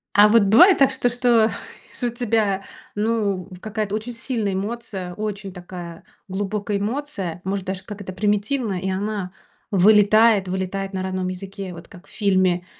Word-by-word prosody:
А 205 +1 +8
вот 220 0 +5
бывает 320 - +7
так 275 -1 +5
что, 255 -2 0
что, 240 -2 +3 0.4
что 245 - -2
у - - 0
тебя, 220 -5 0 0.3
ну, 205 -4 0
в 180 - -11
какая-то 215 -1 -3
очень 220 +3 -4
сильная 230 -4 -2
эмоция, 195 -2 -4
очень 205 -1 -5
такая 175 -2 -9 0.2
глубокая 205 +1 -2
эмоция. 205 - -4
Может 195 0 -2
даже 190 0 -4
как 205 -1 -8
это 185 -1 -6
примитивная, 210 +1 0
и 190 - -3
она 195 -1 -3 0.4
вылетает, 210 +1 +5
вылетает 190 +1 -3
на 185 - -2
родном 185 -1 -2
языке. 190 0 -7
Вот 170 0 -11
как 180 -1 -15
в - - -15
фильме 185 -4 +1
200 Hz, 165 wpm, -22 LUFS, 190-220 Hz, 0.4 s, А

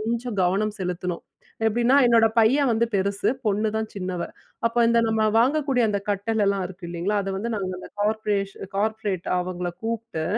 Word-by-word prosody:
கொஞ்சம் 230 -1 -3
கவனம் 205 +4 +1
செலுத்தணும். 180 -1 -3 0.4
எப்படின்னா? 235 +4 +3
என்னோட 230 -1 +5
பையன் 260 +5 +4
வந்து 230 +1 +2
பெருசு. 200 +1 0 0.2
பொண்ணுதான் 215 +2 0
சின்னவ. 185 -3 -3 0.4
அப்ப 230 - -1
இந்த, 235 0 +4
நம்ம 220 0 +1 0.2
வாங்கக்கூடிய 270 0 +2
அந்த 200 -1 0
கட்டலலாம் 200 -1 +1
இருக்கு 180 0 -12
இல்லைங்களா, 180 +5 -1
அத 195 - -3
வந்து, 225 +5 -3
நாங்க 190 -2 -3
அந்த - - -10
கார்பெண்டர், 205 -2 0 0.2
கார்பெண்டர். 210 -3 -1
அவங்கள 180 0 -3
கூப்ட்டு. 225 -8 -3
210 Hz, 150 wpm, -24 LUFS, 190-230 Hz, 0.4 s, என்னோட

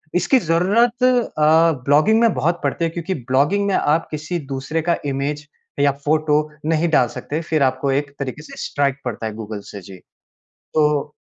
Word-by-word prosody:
इसकी 255 +9 +3
ज़रूरत 210 +8 +1
अ, 165 -10 +3
ब्लॉगिंग 155 +11 +4
में 230 -2 +4
बहुत 165 +7 0
पड़ती 170 - 0
है - - 0
क्योंकि 170 +3 -3
ब्लॉगिंग 140 +10 +1
में 195 - +1
आप 155 +3 +1
किसी 155 +3 -3
दूसरे 135 +4 -2
का 170 +1 +1
इमेज 145 +2 -3 0.3
या 140 0 +4
फ़ोटो 150 0 +2 0.3
नहीं 165 +1 +1
डाल 140 -6 +3
सकते 150 +6 -5
फ़िर 155 -2 0
आपको 130 +1 0
एक 145 +1 -1
तरीके 140 +1 -5
से - - -12
स्ट्राइक 140 -2 0
पड़ता 115 -2 -4
है 110 - -3
गूगल 110 -1 -6
से। 100 - -8
जी। 95 +1 -12 0.8
तो 150 -1 +1
150 Hz, 175 wpm, -20 LUFS, 140-170 Hz, 0.8 s, ब्लॉगिंग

